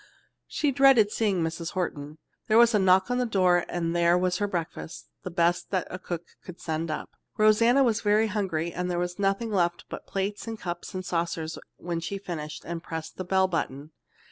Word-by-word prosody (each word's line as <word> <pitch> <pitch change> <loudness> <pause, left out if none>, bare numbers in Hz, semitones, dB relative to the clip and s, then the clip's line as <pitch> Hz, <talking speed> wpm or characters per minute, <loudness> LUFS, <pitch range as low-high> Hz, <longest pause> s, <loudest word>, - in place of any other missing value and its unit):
She 295 -2 0
dreaded 270 -6 +5
seeing 200 -7 +1
Mrs. 165 +1 -4
Horton. 155 -5 -3 0.3
There 220 - +4
was 235 0 +6
a 210 - +4
knock 190 +3 +4
on 245 - +1
the 250 - +1
door 180 -4 +3
and 170 -1 -2
there 170 0 +4
was 180 0 +1
her 205 - +1
breakfast, 170 -2 -5
the - - -5
best 170 0 +1
that 185 -3 -1
cook 175 -2 -4 0.2
could 180 -1 -10
send 160 0 -3
up. 155 - -4 0.3
Rosanna 230 +5 +5
was 230 -4 +1
very 210 +1 +3
hungry, 190 -6 -2
and 180 0 -2
there 175 - -1
was 175 +2 -3
nothing 200 +3 0
left 175 -3 0
but - - -8
plates 200 +3 -3
and 225 -1 -5
cups 175 0 -6
and 185 0 -4
saucers 165 -2 -2 0.2
when 170 -1 -3
she 185 +4 -4
finished 160 -6 -6
and 170 0 -4
pressed 160 -1 -6
the 185 - -3
bell 190 +1 +2
button. 150 -4 -3
180 Hz, 195 wpm, -27 LUFS, 170-205 Hz, 0.3 s, was